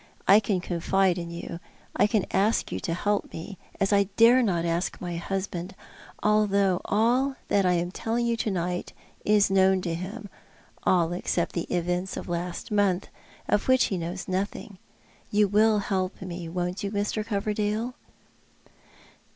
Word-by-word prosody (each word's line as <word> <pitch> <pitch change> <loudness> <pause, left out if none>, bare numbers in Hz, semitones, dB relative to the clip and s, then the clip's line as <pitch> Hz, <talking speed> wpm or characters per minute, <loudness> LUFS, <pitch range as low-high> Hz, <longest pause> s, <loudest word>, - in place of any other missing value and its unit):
I 200 +2 +8
can 200 -3 -1
confide 180 +1 +1
in 170 -1 -5
you. 170 0 -6 0.4
I - - +4
can 210 -3 +1
ask 205 +4 +1
you 95 - -2
to 165 - -2
help 205 +3 -1
me, 175 +3 -8 0.2
as 195 +1 +2
I 200 0 +4
dare 235 +3 +7
not 175 -7 +1
ask 170 +1 -1
my 175 -2 -4
liusband 190 0 -4 0.3
— - - -18
although 200 -3 +3
all 245 +6 +2
that 195 -2 +3
I 180 - +3
am 175 0 -1
telling 230 +4 -1
you 235 0 +1
to 225 - -1
night 180 -2 -2 0.3
is 210 -2 +3
known 190 0 +4
to 170 -2 -2
him 200 +6 -6 0.3
— - - -30
all 175 -2 +3
except 175 -1 -1
the 170 - -2
events 180 +2 -1
of - - -5
the - - -6
last 175 +3 -4
month, 200 -3 +1 0.4
of 205 - +1
which 260 0 +5
he - - 0
knows 175 +3 -5
nothing. 190 +1 -3 0.5
You 210 0 +3
will 215 +2 +4
help 190 -2 -2
me, 175 -2 -6
won't 180 +3 -3
you, 200 - -1
Mr. 205 +1 -1
Coverdale? 210 +2 -1
195 Hz, 170 wpm, -26 LUFS, 180-210 Hz, 0.5 s, I